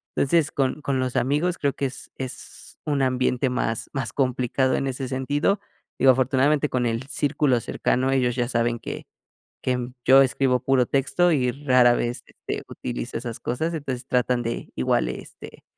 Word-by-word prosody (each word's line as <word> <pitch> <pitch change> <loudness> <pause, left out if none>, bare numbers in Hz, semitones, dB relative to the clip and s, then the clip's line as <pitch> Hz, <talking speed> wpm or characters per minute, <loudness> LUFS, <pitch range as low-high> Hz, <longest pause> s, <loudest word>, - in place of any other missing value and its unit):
entonces 155 +2 +2
con 135 +2 0
con 140 -2 -1
los 130 -1 -2
amigos 150 +7 +1
creo 140 -1 0
que - - -6
es 135 0 -7
es 130 -1 -9
un 145 -3 0
ambiente 130 0 +1
más 125 -3 -2
más 125 -5 -3
complicado 130 0 +1
en 135 - -1
ese 130 0 -3
sentido, 145 +9 0 0.4
digo 130 - +7
afortunadamente 135 +3 +2
con 125 -1 0
el 115 +1 -1
círculo 145 -3 +1
cercano, 130 +3 0
ellos 125 -3 +1
ya 120 - +1
saben 120 -1 0
que - - -7 0.6
que 125 -1 -1 0.2
yo 135 +1 +8
escribo 130 -1 +1
puro 130 -1 +3
texto 175 +6 +2
y 125 -5 +2
rara 125 -2 +4
vez, 120 +1 -2
este, - - -6
utilizo - - -5
esas 115 -1 -6
cosas, 160 +8 -2
entonces 135 -5 -4
tratan 125 -1 +1
de 115 0 -4
igual, 65 - +1
este, - - -10
130 Hz, 165 wpm, -24 LUFS, 125-140 Hz, 0.6 s, yo